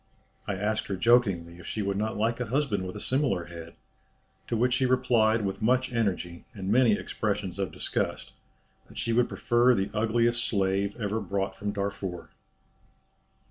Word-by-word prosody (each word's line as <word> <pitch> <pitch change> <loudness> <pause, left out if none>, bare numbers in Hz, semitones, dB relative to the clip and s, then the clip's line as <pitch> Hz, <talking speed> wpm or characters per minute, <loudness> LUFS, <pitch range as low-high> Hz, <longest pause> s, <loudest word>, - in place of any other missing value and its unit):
I 100 - -1
asked 105 +3 -1
her 100 - -2
jokingly 95 -6 +2
if 90 - -11
she 110 - -2
would 100 0 -1
not 110 +2 -2
like 115 +3 0
a 125 - -2
husband 115 -7 0
with 90 - -7
a - - -5
similar 130 - 0
head, 85 -1 -10 0.7
to 115 - -1
which 125 +2 +2
she 130 +1 +2
replied 115 -4 +3
with 95 +2 -3
much 125 +3 +2
energy, 90 -6 -1
and 95 -1 -3
many 120 -1 +5
expressions 100 -3 -2
of 95 - -1
disgust, - - -3 0.6
that - - -14
she 115 - 0
would 120 +1 +3
prefer 120 +1 +3
the 95 0 -1
ugliest 115 +2 +1
slave 100 0 0
ever 105 0 -1
brought 100 -1 -2
from 105 0 -3
Darfur." 100 -3 -4
105 Hz, 170 wpm, -28 LUFS, 95-120 Hz, 0.7 s, many